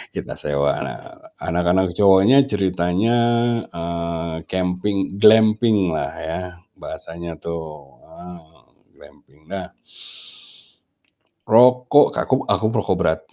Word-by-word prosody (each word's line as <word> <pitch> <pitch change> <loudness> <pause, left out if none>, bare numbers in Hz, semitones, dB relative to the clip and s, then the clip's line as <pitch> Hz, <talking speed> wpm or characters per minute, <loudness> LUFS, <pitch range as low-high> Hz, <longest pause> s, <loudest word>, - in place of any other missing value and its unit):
kita - - -6
sewa. 70 -1 -1
Nah - - -6 0.4
anak-anak 90 +2 0
cowoknya 100 +7 +5
ceritanya, 95 +3 0 0.6
eee, 85 -1 -5
camping 95 +1 -2
glampinglah 110 - +3
ya 80 +1 -5 0.4
bahasanya 85 -1 -7
tuh, 85 +2 -6 0.5
eee, 90 -1 -12 0.6
glamping. 75 +2 -21
Nah 95 -2 -7 1.8
rokok 125 +5 +5
kaku 130 0 -1
aku 110 - 0
perokok 105 -5 -1
berat 80 -2 +1
90 Hz, 90 wpm, -20 LUFS, 85-105 Hz, 1.8 s, cowoknya